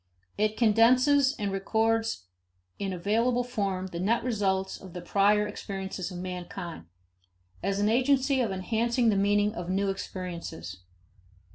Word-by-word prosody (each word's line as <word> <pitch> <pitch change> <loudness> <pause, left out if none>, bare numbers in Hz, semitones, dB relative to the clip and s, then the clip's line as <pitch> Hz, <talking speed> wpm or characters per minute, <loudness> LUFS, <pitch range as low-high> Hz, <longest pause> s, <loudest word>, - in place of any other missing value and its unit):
It 215 +1 0
condenses 255 +5 +4
and 200 -2 -2
records 225 - 0 0.5
in 195 -1 -2
available 230 +7 +1
form 200 -6 -2
the 175 -2 -6
net 225 +6 +1
results 195 -5 -1
of 185 -3 -11
the 180 - -6
prior 205 +3 +3
experiences 195 -3 -5
of 180 - -7
mankind, 180 - -6 0.7
as 195 0 -1
an 205 - +2
agency 260 +3 +3
of 225 -5 0
enhancing 230 +5 +1
the 210 - +2
meaning 205 +1 +2
of 175 0 -6
new 195 +1 +1
experiences. 170 - -6
205 Hz, 135 wpm, -28 LUFS, 190-230 Hz, 0.7 s, condenses